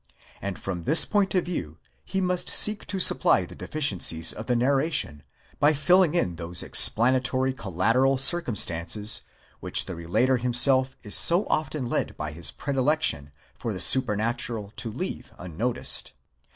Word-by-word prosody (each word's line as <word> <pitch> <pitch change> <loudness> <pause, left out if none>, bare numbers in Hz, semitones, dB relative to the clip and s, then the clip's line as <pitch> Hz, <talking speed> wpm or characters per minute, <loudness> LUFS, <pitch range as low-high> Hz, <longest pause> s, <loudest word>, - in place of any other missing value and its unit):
And 100 -2 -6
from 90 -4 -7
this 160 - +6
point 200 -2 -1
of 180 - 0
view 85 - -6 0.3
he 190 0 -4
must 180 -1 -2
seek 210 0 +4
to 195 - -3
supply - - +4
the - - -14
deficiencies 90 - -1
of 110 - -10
the 125 - 0
narration, 135 - -1 0.4
by 150 +2 +3
filling 175 +3 +1
in 90 - -2
those 85 0 -3
explanatory 130 +2 +3
collateral 115 +6 -1
circumstances, 105 - +1 0.4
which - - +4
the 95 - -8
relator 90 +11 -1
himself 130 +2 +1
is 105 -3 -5
so 175 +5 +5
often 155 -3 -3
led 120 - -4
by 75 0 -6
his 80 0 -6
predilection 135 - -2 0.2
for - - -6
the - - -7
supernatural 115 -3 -1
to 115 - -4
leave - - -7
unnoticed. 90 +8 -4
125 Hz, 145 wpm, -24 LUFS, 95-150 Hz, 0.4 s, this